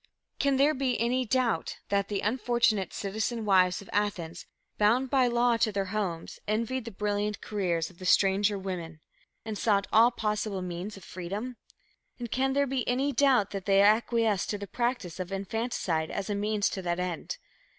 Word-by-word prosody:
Can 280 -1 +2
there 285 +3 +4
be 260 -2 -1
any 250 +3 +1
doubt 235 -7 0
that 200 -1 +1
the 200 -2 -2
unfortunate 230 -4 +1
"citizen 220 +3 -3
wives" 185 -1 +3
of - - -17
Athens, 185 -5 -2 0.3
bound 240 +5 +3
by 260 -2 +4
law 240 0 +3
to 220 - +2
their 195 0 -2
homes, 180 -6 -3
envied 230 +4 -1
the 230 - -6
brilliant 205 +1 -1
careers 175 -6 -1
of 170 - -22
the 185 - -8
"stranger 200 +2 +3
women," 175 -4 -5 0.5
and 220 -2 -4
sought 200 -3 +2
all 225 +2 +7
possible 210 -4 -2
means 180 +4 -5
of 195 - -13
freedom? 200 +9 -5 0.6
And 240 -2 -6
can 265 +1 +1
there 280 +1 +3
be 265 -3 -2
any 265 +3 +1
doubt 255 -6 +3
that 195 -2 -5
they 195 -1 +4
acquiesced 220 -1 +2
in 205 - -7
the - - -3
practice 235 -5 -2
of 185 0 -4
infanticide 195 -5 -2
as 200 +1 -3
a - - +1
means 205 0 +1
to 190 - -4
that 175 -1 -2
end? 180 -2 -3
210 Hz, 180 wpm, -29 LUFS, 190-240 Hz, 0.6 s, all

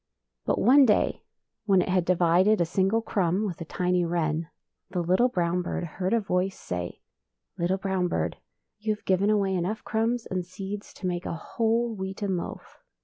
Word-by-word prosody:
But - - +2
one 270 +1 +6
day, 210 - +2 0.4
when 195 -3 +4
it - - -5
had 180 -2 +2
divided 180 +4 +4
a 170 - +3
single 195 +6 +1
cmmb 190 0 0
with 180 -4 -5
a - - -4
tiny 180 +2 0
wren, 165 -1 -1 0.4
the 180 -1 -2
little 185 +9 +3
brown 175 -4 0
bird 175 - -3
heard 180 +3 -3
a 230 - +4
voice 190 -2 -1
say, 90 -1 -5 0.3
" - - -54
Little 180 +3 +1
brown 190 -2 0
bird, - - -2 0.4
you 215 0 0
have 210 - -24
given 190 +2 +2
away 200 -2 +2
enough 185 +4 -2
crumbs 225 +2 0
and 185 -1 -2
seeds 195 +3 -7
to - - -8
make 180 0 -2
a - - -2
whole 230 +6 0
wheaten 190 0 -3
loaf. 175 - -7
185 Hz, 185 wpm, -27 LUFS, 175-210 Hz, 0.4 s, one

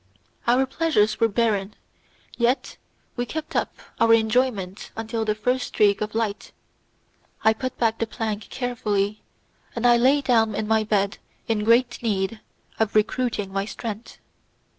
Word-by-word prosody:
Our 250 +3 +4
pleasures 265 -7 +1
were 230 - +4
barren, 210 -2 0 0.6
yet 245 +2 0 0.4
we 245 0 -2
kept 315 +3 -5
up - - 0 0.2
our 230 0 +6
enjoyment 220 -4 0
until 225 0 -3
the 215 -1 0
first 250 +4 0
streak 205 -1 +2
of 215 0 -3
light. 220 -2 -2 0.9
I 220 - +5
put 255 +3 -5
back 225 -1 +1
the 230 - 0
plank 215 -2 -4
carefully, 215 -5 -1 0.5
and 235 0 -2
I 240 0 +6
lay 265 +4 +4
down 225 -5 +2
in 215 - -2
my 220 0 +3
bed 205 -1 0 0.3
in 220 -2 0
great 235 +3 +3
need 215 -1 -1 0.4
of 220 -1 0
recruiting 215 -2 0
my 195 0 -1
strength. 220 +1 -7
225 Hz, 145 wpm, -24 LUFS, 210-240 Hz, 0.9 s, our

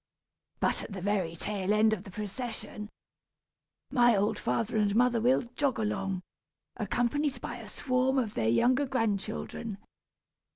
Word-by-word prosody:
But - - +2
at - - -8
the 190 - -5
very 190 -5 0
tail 200 +2 -1
end 215 +1 +4
of 200 -2 -4
the - - -9
procession, 210 +1 -5 1.0
my 240 -4 +5
old 205 +2 +1
father 230 0 -1
and 205 -1 +2
mother 240 -1 +3
will 255 +3 +3
jog 280 -3 +1
along, 195 -4 -1 0.5
accompanied 275 +4 0
by - - -5
a - - -9
swarm 260 0 +1
of 230 -5 0
their 110 -1 +1
younger 255 - +3
grandchildren. 220 -2 -2
220 Hz, 140 wpm, -30 LUFS, 200-250 Hz, 1.0 s, my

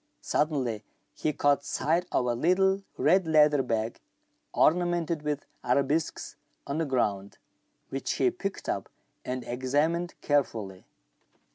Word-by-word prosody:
Suddenly 130 -8 0 0.3
he 155 - -1
caught 145 -1 +2
sight 165 +7 0
of - - +1
a 120 - +1
little 190 +9 +2 0.2
red 180 +3 +3
leather 150 -2 +5
bag, 115 -3 -2 0.5
ornamented 175 -1 +2
with 150 -1 -3 0.2
arabesques, 140 +5 0 0.3
on 140 +3 -2
the 165 - +1
ground, 100 -7 -1 0.5
which - - -2
he - - +2
picked - - -5
up - - -2 0.3
and 125 0 -4
examined 145 +8 0
carefully. 110 -10 -1
145 Hz, 120 wpm, -28 LUFS, 125-165 Hz, 0.5 s, leather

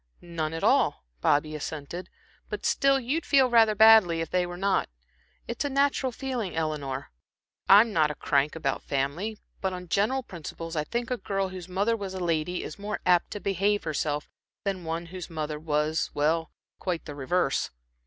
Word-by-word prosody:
"None 165 -3 -3
at 165 - -5
all," 65 - +3 0.2
Bobby 155 +1 +2
assented, 155 +4 -6 0.4
"but - - -5
still 275 -1 +3
you'd 270 +7 -1
feel 265 -3 +4
rather 225 -2 +5
badly 215 -6 +7
if 165 -1 -3
they 180 -1 +1
were 175 0 -7
not. 195 - +1 0.6
It's 235 - -3
a 285 - -1
natural 275 -1 +1
feeling, 245 -7 -4
Eleanor. 145 -4 -3 0.6
I'm 210 +3 +7
not 155 -3 +3
a 150 - -4
crank 140 +2 +1
about 140 -4 -1
family, 145 +11 -2 0.2
but 190 -1 -1
on 180 0 -7
general 245 +9 +1
principles, 165 -3 -7
I 150 -1 0
think 240 - -3
a 250 - +1
girl 195 -3 -2
whose 185 -1 -8
mother 200 +5 +1
was 195 -3 -5
a - - -4
lady 170 0 -1
is 155 - -8
more 210 +1 -3
apt 180 -1 +4
to 205 - -5
behave 200 +1 +1
herself 150 -1 -2 0.4
than 190 -4 -3
one 165 +1 -3
whose 180 +1 -8
mother 155 -2 -4
was 155 0 0
well, 160 +3 +1 0.3
quite 180 -3 -3
the 150 - -6
reverse." 145 +1 0
180 Hz, 180 wpm, -27 LUFS, 155-210 Hz, 0.6 s, badly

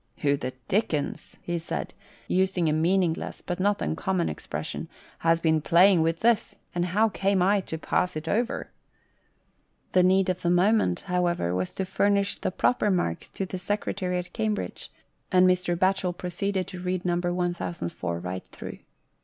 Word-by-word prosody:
" - - -41
Who 140 -1 +4
the 130 -2 -4
dickens," 170 -8 -1
he 175 -1 -2
said, 165 - -4 0.3
using 185 -2 +1
a 155 - +2
meaningless, 170 +1 0
but 175 0 -3
not 205 +2 +1
uncommon 180 +1 0
expression, - - -5 0.3
"has 165 0 +3
been 160 -1 +2
playing 175 +3 +5
with 165 +1 0
this; 230 -1 +2 0.2
and 175 0 0
how 210 +5 +2
came 195 -1 +1
I 200 +2 +3
to 160 - -3
pass 180 +2 0
it 155 +1 -5
over?" 235 +7 -1 1.2
The 185 - +5
need 190 +1 +4
of 180 -1 -1
the 175 - +1
moment, 180 - +3
however, 175 - 0
was 90 0 -1
to 190 - -2
furnish 200 +1 +1
the - - -1
proper 210 +3 +1
marks 175 - -1
to 195 - -4
the 185 0 -5
secretary 185 -1 -2
at 180 0 -5
Cambridge, 215 -2 -3 0.4
and 185 0 +6
Mr. 180 -1 +1
Batchel 185 -1 +1
proceeded 185 +2 -2
to 180 -2 -7
read 180 0 -2
No. 175 - +2
1004 175 - -2
right 90 +2 -5
through. - - -9
180 Hz, 165 wpm, -27 LUFS, 170-195 Hz, 1.2 s, and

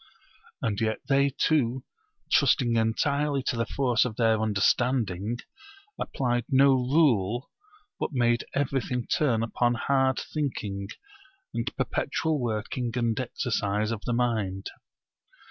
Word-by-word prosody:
And 105 -2 -1
yet 110 -1 0
they 140 0 +3
too, 130 -3 +1 0.5
trusting 130 -4 +3
entirely 140 +5 +1
to 130 - -1
the 115 -1 -1
force 125 -4 +2
of 120 -4 -3
their 110 -2 +2
understanding, 110 0 +1 0.6
applied 120 -3 -1
no 135 +1 +5
rule, 125 - +2 0.5
but - - -2
made 120 -3 +2
everything 130 -3 -1
turn 120 -7 +1
upon 120 +1 +1
hard 135 +1 +1
thinking 105 -10 -3 0.7
and - - -1
perpetual 160 -2 -1
working 115 +1 -2
and 120 -1 0
exercise 110 -4 -1
of 110 -2 -3
the 120 - 0
mind. 110 -6 -1
120 Hz, 115 wpm, -27 LUFS, 110-135 Hz, 0.7 s, no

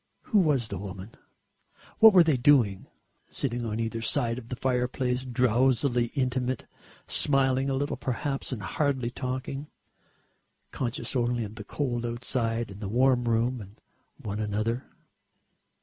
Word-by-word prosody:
Who 215 - +2
was 145 -10 +2
the 100 - -4
woman? 100 +2 -8 0.9
What 220 0 +10
were 185 -3 +7
they 160 -3 +2
doing? 120 -7 +3 0.4
Sitting 120 -3 -2
on 110 -1 -3
either 115 0 -2
side 115 +1 +1
of 115 - -13
the 125 - -3
fireplace 125 0 -1
drowsily 125 +1 +2
intimate, 130 -2 -1 0.4
smiling 135 -1 +3
a 135 - 0
little 145 +2 -2
perhaps 135 +3 -3
and 110 -6 -4
hardly 135 - -1
talking, 130 +3 -4 1.0
conscious 130 +3 -2
only 120 -1 +1
of 105 -1 -7
the 110 -1 -8
cold 120 0 -2
outside 120 -2 -2
and 100 +2 -10
the 100 - -4
warm 125 +2 +3
room 120 +1 +1
and 100 +1 -13 0.4
one 105 0 -5
another.... 110 +4 -1
125 Hz, 140 wpm, -27 LUFS, 115-130 Hz, 1.0 s, What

